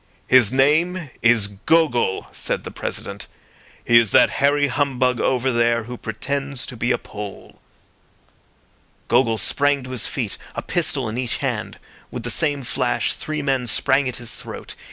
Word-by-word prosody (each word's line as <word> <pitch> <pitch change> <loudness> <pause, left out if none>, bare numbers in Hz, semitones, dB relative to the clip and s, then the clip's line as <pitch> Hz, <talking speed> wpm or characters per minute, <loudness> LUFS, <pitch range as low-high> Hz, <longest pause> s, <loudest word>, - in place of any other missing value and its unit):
"His 125 -5 +5
name 155 +4 +2
is 115 -3 +4 0.2
Gogol," 150 -12 +2
said - - -3
the - - -7
President. 100 0 -5 0.6
"He 115 0 +7
is 115 -3 +2
that - - +5
hairy 145 +1 +4
humbug 130 -2 0
over 130 0 +1
there 115 -1 +2
who 125 +2 -7
pretends 135 +4 -3
to 125 - -8
be 120 +1 0
a - - +2
Pole." 105 -2 -9 1.5
Gogol 115 -4 +3
sprang 145 +3 +1
to 130 - -8
his 125 -4 0
feet, - - -3 0.2
a - - -4
pistol 145 -7 0
in 110 +3 -4
each 125 -2 -2
hand. - - -3 0.3
With 120 - -6
the 120 - 0
same 145 0 0
flash 125 0 0
three 155 -1 -4
men 135 -3 0
sprang 135 +4 +2
at 125 - -4
his 120 -2 -5
throat. - - -8
130 Hz, 160 wpm, -21 LUFS, 115-140 Hz, 1.5 s, He